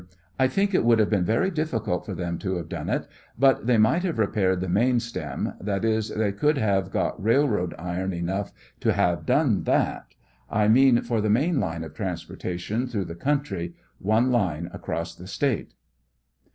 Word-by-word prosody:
I 130 - +5
think 200 +7 0
it - - +3
would 115 0 +5
have 110 -1 +2
been 95 -4 +2
very 115 - +1
difficult 140 - -2
for 100 - -4
them 85 -1 -3
to 95 -1 -2
have 85 -2 -4
done - - -5
it, - - -1 0.3
but 135 -2 +3
they 125 -2 +4
might 110 +11 +4
have 175 -6 -2
repaired 100 -4 +1
the 95 - -3
main 120 +7 +3
stem; 115 0 -4
that 100 +1 -1
is, 110 -1 +1
they 105 -1 0
could 150 +9 +1
have 100 -5 +1
got - - -2
railroad 110 -6 +2
iron 90 +3 -3
enough 95 +3 -3 0.3
to - - +2
have 85 -3 0
done - - +3
that; - - 0 0.3
I 105 0 +2
mean 125 +1 +5
for 115 -2 0
the 105 - 0
main 140 +8 +2
line 80 -4 -2
of 80 -2 -9
transportation 90 +5 -4
through 105 -6 -2
the. 85 - -6
country; 100 -8 -2 0.2
one 110 +6 +2
line 90 -8 0
across 85 +1 -4
the 90 +2 -12
State. 130 +4 -1
105 Hz, 185 wpm, -25 LUFS, 90-120 Hz, 0.3 s, I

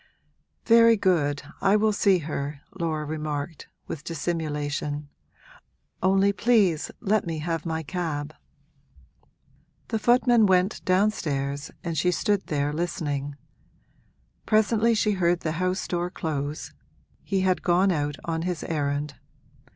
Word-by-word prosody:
'Very 230 0 +6
good, 150 -8 +1 0.2
I 195 +1 +4
will 215 0 +3
see 200 -2 +4
her,' 145 -3 -4 0.2
Laura 155 -3 -1
remarked, 150 0 -4 0.2
with 155 - -6
dissimulation: 150 -3 -3 0.9
'only 195 +2 +3
please 200 -7 +2
let 210 -3 +1
me 165 -1 -2
have 165 +1 -3
my 160 0 -2
cab.' 155 -3 -3 1.6
The 220 - -1
footman 240 -1 +4
went 185 +1 +2
downstairs 150 -8 0
and 170 -1 -3
she 165 +4 +2
stood 200 +2 0
there 145 -1 -1
listening; 145 -4 -3 1.1
presently 220 +1 +3
she 215 0 +2
heard 175 -3 +1
the 155 - -1
house 185 0 -1
door 175 0 -1
close 150 -4 -4 0.5
he 195 -1 0
had 185 -1 +1
gone 180 +3 +3
out 145 -3 -1
on 165 -1 -2
his 175 -2 -3
errand. 145 -2 -2
170 Hz, 120 wpm, -26 LUFS, 150-195 Hz, 1.6 s, Very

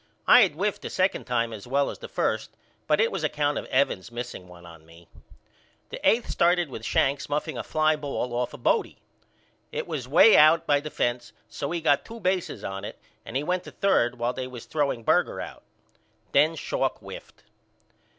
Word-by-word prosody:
I 250 - +8
had 190 -7 +3
whiffed 200 +6 -2
the - - -6
second 185 +1 0
time 115 -2 -1
as 105 +1 -9
well 140 +2 +1
as - - -11
the - - -8
first - - -1 0.4
but 150 - +2
it 225 - +3
was 190 -4 -4
account 145 -1 0
of - - -8
Evans 130 -6 0
missing 120 -6 -7
one 90 -1 -14
on 85 -1 -14
me. 85 +1 -18 0.8
The - - -7
eighth 230 +1 +1
started 175 -1 +2
with 110 - -7
Shanks 140 +5 0
muffing 145 +1 -2
a - - -3
fly 155 0 +1
ball 140 -4 -4
off 120 0 -1
of 125 - -15
Bodie. - - +1 0.7
It - - -3
was 150 -7 -5
way 185 - +7
out 160 +2 +6
by 145 -2 +3
the 155 +2 -7
fence 120 -3 -2
so 140 - -5
he 170 0 -2
got 145 -3 +2
two 230 0 -10
bases 185 -3 -1
on 95 0 -5
it - - -7 0.3
and 125 - -2
he 140 - -2
went 180 +3 -1
to - - -9
third 125 -11 +1
while 120 +1 -1
they 130 0 -5
was 125 -2 -10
throwing 140 -6 -1
Berger - - +1
out. - - -8 0.7
Then 155 +4 +4
Schalk - - -2
whiffed. - - -12
145 Hz, 200 wpm, -26 LUFS, 120-165 Hz, 0.8 s, I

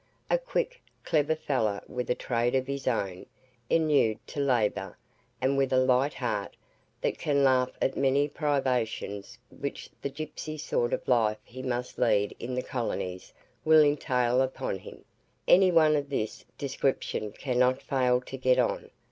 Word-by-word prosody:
A - - +4
quick, - - -2 0.2
clever 155 0 +2
fellow 125 -10 0
with 125 0 -4
a 125 - +2
trade 120 +1 0
of 130 -1 +1
his 140 0 -4
own, 100 -7 -1 0.4
inured 150 -9 +3
to - - -5
labour, 110 -8 0 0.4
and 135 +2 +1
with 135 -1 +1
a 130 - +3
light 130 +2 +3
heart, 105 -6 -3 0.5
that - - -1
can 140 -2 +2
laugh 130 -1 +4
at 135 - +1
the - - -5
many 140 +1 +3
privations 125 -7 -1
which 140 - -6
the - - -2
gipsy 155 +2 -6
sort 120 -5 -1
of - - -2
life 110 -4 +3
he 130 +2 -9
must 125 -1 -3
lead 100 0 +2
in 125 +2 -4
the 125 - -1
colonies 95 -8 -4 0.3
will 155 -1 +7
entail 130 -4 +2
upon 130 -7 -2
him; - - -12 0.4
any 185 +1 +7
one 155 -2 +5
of 145 -1 -1
this 110 -6 -3
description 135 -5 -1
cannot 125 +2 +1
fail 125 -2 +2
to 135 - -8
get 130 -1 +3
on. 125 -2 0
130 Hz, 160 wpm, -28 LUFS, 120-145 Hz, 0.5 s, will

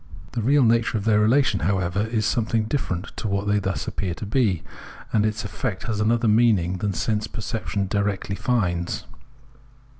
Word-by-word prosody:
The 120 - -2
real 140 +5 +4
nature 115 -1 +3
of 100 - -4
their 105 -2 +4
relation, 110 -1 +3
however, 95 +3 0
is 110 -2 0
something 110 -1 +1
different 110 -6 -3
from 110 - -2
what 100 +1 -1
they 105 0 +2
thus 95 -1 -3
appear 90 -4 -3
to 105 - -6
be, 100 -7 +1 0.5
and 105 - +3
its 105 0 -3
effect 95 -1 -3
has 110 -3 -2
another 115 +2 +2
meaning 105 -5 +3
than 100 +1 0
sense 105 +2 -1
perception 105 -2 -3
directly 100 0 -1
finds. 90 -8 -1
105 Hz, 170 wpm, -24 LUFS, 100-115 Hz, 0.5 s, real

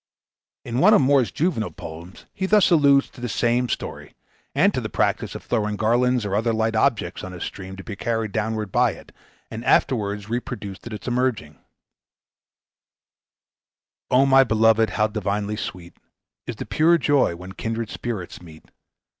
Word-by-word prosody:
In 120 +1 -2
one 210 +7 +6
of - - +5
Moore's 135 -4 +3
juvenile 145 - -1
poems 85 +2 -11
he 190 - -2
thus 210 -2 +4
alludes 140 -4 +5
to 125 - -14
the 120 - -3
same 120 +3 +1
story, - - -5 0.4
and - - +4
to - - -1
the - - -5
practice - - -1
of - - -7
throwing 105 -3 -1
garlands 120 +2 +1
or 100 -1 -1
other 115 +2 +1
light 110 0 0
objects 110 -7 0
on 95 - -7
his 90 - -6
stream 95 0 -7
to 95 - -10
be 105 - -7
carried 110 0 -2
downward 110 -1 -2
by - - +2
it, - - -15 0.4
and 110 +2 -6
afterwards 105 -6 +1
reproduced 110 -3 -5
at 120 - -7
its 105 - -8
emerging: 120 - -1 2.5
"O 130 +2 +4
my 135 0 +6
beloved, 110 -1 +3
how 105 - +1
divinely 105 0 -2
sweet 90 -4 -7 0.5
Is - - -4
the - - -6
pure 170 +2 +3
joy 145 - +2
when 90 +2 -10
kindred 115 +2 -4
spirits 105 -9 -5
meet! 80 -3 -15
110 Hz, 165 wpm, -23 LUFS, 100-125 Hz, 2.5 s, one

